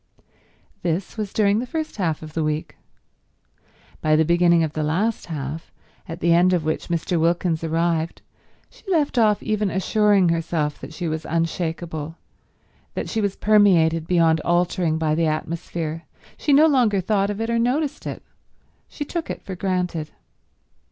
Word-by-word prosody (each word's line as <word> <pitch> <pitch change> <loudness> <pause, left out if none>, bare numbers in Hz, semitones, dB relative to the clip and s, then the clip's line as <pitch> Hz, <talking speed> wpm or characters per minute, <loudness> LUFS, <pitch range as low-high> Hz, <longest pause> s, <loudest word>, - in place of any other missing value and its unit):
This 175 +2 -2
was 215 -3 -4
during 205 0 +2
the 250 - -4
first 315 0 -4
half 165 -6 -1
of 155 -1 -10
the 160 - -1
week. 155 0 -2 1.3
By 155 0 +3
the 160 +1 +3
beginning 170 0 +4
of 155 -2 -2
the 155 - -2
last 185 +9 -1
half, 150 0 -5 0.4
at 165 - -7
the 170 0 +4
end 180 +2 +4
of 170 -4 0
which 155 - -2
Mr. 170 0 -1
Wilkins 170 0 +1
arrived, 165 0 -1 0.5
she - - -20
left 300 -8 +1
off 210 -2 +3
even 215 -2 0
assuring 200 0 +3
herself 165 -2 -1
that - - -8
she 170 +2 -4
was 160 0 -3
unshakeable, 165 -1 -3 0.8
that - - -3
she 225 - -1
was 200 -1 -1
permeated 170 -7 +3
beyond 165 -2 +3
altering 175 -1 +1
by 155 -1 0
the 165 +1 +1
atmosphere, 160 +1 -3 0.3
she 300 - -1
no 290 +3 +7
longer 245 -10 +3
thought 200 +1 +1
of 205 0 -4
it 225 +1 -1
or 235 - +1
noticed 280 +5 -1
it; - - -6 0.7
she 290 - -5
took 335 +1 -4
it - - -5
for 190 - -6
granted. 180 -4 -2
170 Hz, 165 wpm, -22 LUFS, 160-205 Hz, 1.3 s, no